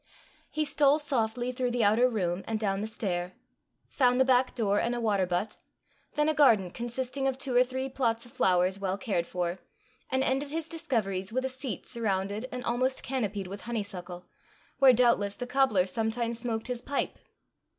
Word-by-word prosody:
He 310 0 -1
stole 285 0 +4
softly 250 -4 -1
through 250 0 -1
the 240 -1 0
outer 225 +5 +4
room, 185 -5 -1
and 220 -1 -1
down 195 -2 0
the 215 - -2
stair; 185 -5 -3 0.5
found 250 -2 +2
the 260 - +5
back 255 0 +3
door 205 -4 +1
and 240 +1 0
a - - -2
water 205 -5 +1
butt; 180 +5 -2 0.6
then 300 0 +2
a 310 - +3
garden 220 - +4
consisting 255 +4 -2
of 265 -1 -1
two 265 -2 -1
or 250 - +7
three 260 +1 -4
plots 240 -3 -1
of 240 - -14
flowers 185 +1 +2
well 195 -1 -1
cared 190 -8 -1
for; 180 0 -2 0.5
and 260 0 +1
ended 270 +2 0
his 320 +1 -3
discoveries 225 - -2
with 260 +3 -1
a - - 0
seat 260 - -5
surrounded 210 0 -2
and 250 -1 -5
almost 255 +2 0
canopied 210 -7 -2
with 200 +2 -7
honeysuckle, 195 -6 -5 0.5
where 270 -2 +8
doubtless 235 -5 +3
the 245 - -5
cobbler 245 -8 +3
sometimes 225 +3 -1
smoked 230 -2 -3
his 245 -1 -3
pipe! 280 +2 -2
235 Hz, 180 wpm, -29 LUFS, 200-260 Hz, 0.6 s, where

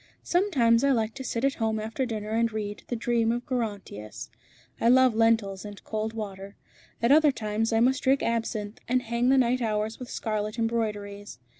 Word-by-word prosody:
Sometimes 275 - +3
I 280 - +4
like 225 -4 +1
to 270 - -7
sit 240 0 -1
at 275 - +2
home 220 -1 +1
after 225 +4 -2
dinner 215 -2 -4
and 230 +1 +1
read 210 -1 -4
'The 245 - -2
dream 230 0 +1
of 240 +1 -3
Gerontius.' 205 - -5 0.5
I 230 - +3
love 260 -1 +6
lentils 220 -4 +2
and 205 -1 -9
cold 220 0 -3
water. 200 -2 -7 0.5
At 235 - +4
other 305 0 +6
times 220 -1 -2
I 225 0 +3
must 260 +2 +3
drink 270 +1 +2
absinthe, 225 -2 -2
and 250 +1 +1
hang 235 +1 0
the 270 - +5
night 250 0 +2
hours 215 -1 -1
with 250 - -8
scarlet 215 0 -3
embroideries. 210 - -3
225 Hz, 185 wpm, -27 LUFS, 215-245 Hz, 0.5 s, love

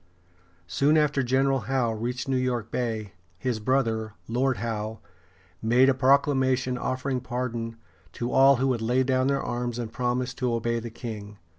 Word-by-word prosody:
Soon 140 - +2
after 150 -2 +2
General 135 +2 +2
Howe 130 -4 +1
reached 120 +4 -3
New 135 - +1
York 125 -3 -1
Bay, 110 -5 -2 0.2
his 120 +2 -2
brother, 110 -3 0
Lord 125 +2 +1
Howe, 110 -2 -3 0.6
made 125 +4 +4
a - - +4
proclamation 130 -1 +2
offering 130 +1 -2
pardon 120 -2 -3 0.4
to 120 +1 -3
all 135 +1 +6
who 135 +2 +1
would 120 -3 0
lay 125 +3 +2
down 130 0 +1
their 140 0 +1
arms 120 -1 -3
and 115 -2 -5
promise 125 +1 -1
to 125 -2 -1
obey 115 0 -1
the 115 +1 -6
king. 105 -3 -7
125 Hz, 160 wpm, -26 LUFS, 115-130 Hz, 0.6 s, all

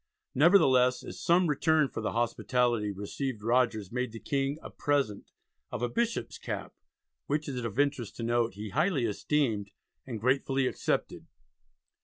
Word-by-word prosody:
Nevertheless, 130 -6 +5
as - - -8
some 175 +2 +4
return 155 0 +3
for 115 - -6
the 110 - -2
hospitality 120 -2 +1
received 105 +4 -4
Rogers 115 -4 +1
made 125 0 -2
the 115 - -8
King 140 +2 -1
a - - -8
present 140 -8 -1 0.4
of - - -4
a 120 - +1
"Bishop's 230 - -2
Cap," - - -5 0.5
which 150 +1 -1
it 140 - -3
is 120 - -3
of 115 -1 -5
interest 140 -6 0
to 115 - -5
note 115 -3 +1
"he 105 +1 -6
highly 155 - +1
esteemed 110 -2 0 0.4
and 115 -3 -4
gratefully 135 +2 +1
accepted." - - -2
125 Hz, 155 wpm, -29 LUFS, 115-145 Hz, 0.5 s, Nevertheless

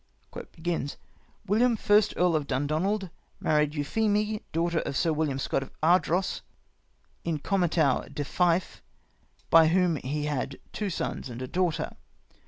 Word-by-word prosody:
" 165 +4 -8
William, 230 +5 +3
first 205 0 +3
Earl 175 -2 +3
of 150 -2 -1
Dundonald, 165 +8 -1 0.3
married 150 -1 +1
Euphemie, 210 +7 0
daughter 170 +1 0
of 135 - -3
Sir 165 - +2
William 150 -3 -1
Scot 135 - -1
of 135 - -8
Ardross, 180 +2 +2 0.8
in 165 -2 -1
comitatu 160 -5 +1
de 145 - -4
Fife, 175 +4 0 0.7
by 165 -1 +8
whom 175 -1 +2
he 145 +3 -3
had 140 -2 -2 0.2
two 210 -2 -2
sons 160 - -3
and 120 0 -7
a 130 - -4
daughter. 175 +1 -1
165 Hz, 135 wpm, -27 LUFS, 150-185 Hz, 0.8 s, by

